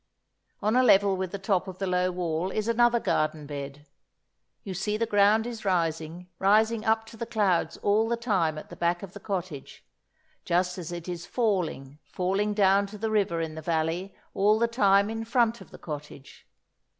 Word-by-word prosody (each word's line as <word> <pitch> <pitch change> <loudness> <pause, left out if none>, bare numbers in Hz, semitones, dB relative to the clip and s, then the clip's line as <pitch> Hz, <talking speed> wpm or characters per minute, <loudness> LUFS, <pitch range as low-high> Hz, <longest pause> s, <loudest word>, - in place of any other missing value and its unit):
On 215 +3 +2
a 255 - +5
level 200 -5 +5
with 185 -1 -3
the 200 - -4
top 195 -1 0
of 185 -1 -7
the 195 - -2
low 180 0 +1
wall 175 -1 -2
is 215 +2 -2
another 240 +1 +3
garden 155 -6 -1
bed. 140 0 -7 0.8
You 195 - -5
see 210 +4 -2
the 230 - 0
ground 210 +1 +3
is 235 -2 -6
rising, 170 -2 -1
rising 215 +3 +3
up 220 0 +1
to 225 - -13
the 235 - -5
clouds 205 -7 +1
all 215 +2 +2
the 235 - 0
time 190 -10 0
at - - -9
the - - -8
back 175 +1 0
of 190 -2 -9
the 205 - -9
cottage, 185 -8 -6 0.6
just 180 +1 0
as 175 -1 -6
it 175 0 -6
is 175 -1 -5
falling, 175 - -1
falling 195 +3 -1
down 200 0 +4
to 210 +1 -10
the 220 +1 -2
river 195 -6 +1
in 160 -1 -4
the 160 - -7
valley 165 +4 -2 0.2
all 210 +2 +3
the 235 +1 +2
time 200 -4 +3
in 225 0 -4
front 235 0 +1
of - - -13
the - - -12
cottage. 145 -3 -9
195 Hz, 195 wpm, -27 LUFS, 170-220 Hz, 0.8 s, a